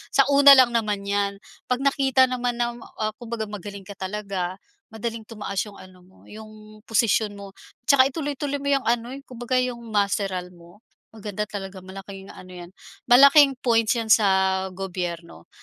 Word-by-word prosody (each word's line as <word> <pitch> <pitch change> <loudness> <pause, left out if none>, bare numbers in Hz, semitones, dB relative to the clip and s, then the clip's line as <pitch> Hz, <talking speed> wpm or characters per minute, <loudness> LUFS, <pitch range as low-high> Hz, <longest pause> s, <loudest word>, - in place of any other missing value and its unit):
Sa 275 - +6
una 280 0 +8
lang 255 -2 +5
naman 215 -4 -1
'yan, 200 0 -1 0.3
'pag 250 +1 -1
nakita 270 -1 +3
naman 250 -1 -1
na, 240 0 -1 0.3
ah, 215 0 0
kumbaga 235 -2 -5
magaling 200 0 -8
ka 205 - -10
talaga, 190 -2 -4 0.3
madaling 225 0 -5
tumaas 210 -3 -7
'yong 205 -2 -13
ano 185 -1 -16
mo, 185 - -23
'yong 215 0 -13
posisyon 220 -1 +1
mo. 200 -1 -10 0.4
Tsaka, 275 -3 +6
ituloy-tuloy 285 -2 -3
mo 280 - -2
'yang 275 -3 +1
ano, 235 +1 0
yung 275 0 -12
kumbaga 250 +1 -3
'yong 250 -1 -1
masteral 195 -3 -1
mo, 175 +2 -18 0.3
maganda 210 -1 -6
talaga, 195 -2 -7
malaking 195 +1 -10
ano 185 - -13
'yan, 175 0 -10 0.4
malaking 275 +2 +7
points 230 -1 +2
'yan 225 -1 -2
sa 210 -3 +3 0.4
gobyerno. 175 - -6
215 Hz, 160 wpm, -23 LUFS, 195-245 Hz, 0.4 s, una